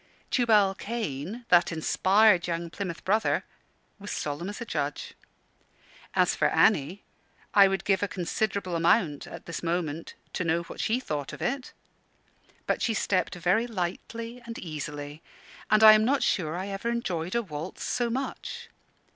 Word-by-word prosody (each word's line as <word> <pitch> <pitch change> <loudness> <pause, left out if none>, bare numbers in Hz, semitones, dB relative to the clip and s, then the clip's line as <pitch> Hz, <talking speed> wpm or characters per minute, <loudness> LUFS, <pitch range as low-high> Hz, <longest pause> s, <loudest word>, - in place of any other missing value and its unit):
Tubal 215 -5 +4
Cain, 210 - -5
that 175 0 +5
inspired 185 +4 +3
young 170 -1 -3
Plymouth 180 -4 -5
Brother, 215 +4 +2 0.6
was 200 +1 -8
solemn 150 +5 -3
as 205 - -7
a 235 - -5
judge. 145 -7 -3 1.0
As - - +3
for - - +3
Annie, 165 +9 +2 0.5
I 200 -1 +8
would 195 0 -1
give 195 -2 +2
a 205 - +1
considerable 190 0 -2
amount, 165 -2 +2
at - - -10
this 170 - -5
moment, 165 -2 -3 0.2
to - - -1
know 170 0 +1
what - - -11
she 230 +3 +1
thought 150 - -4
of - - -9
it. 255 +1 -2 0.9
But - - 0
she 225 - +1
stepped 185 -4 0
very 180 +7 +1
lightly 230 +4 -5
and 230 -1 -7
easily, 150 -2 -6 0.5
and 215 0 +5
I 215 0 +11
am 215 0 +4
not 270 +5 +2
sure 165 -2 0
I 190 +2 -4
ever 200 +4 -3
enjoyed 185 -7 -2
a 235 - +1
waltz 160 -1 -6
so 240 -1 0
much. 260 +4 -5
190 Hz, 155 wpm, -27 LUFS, 165-220 Hz, 1.0 s, I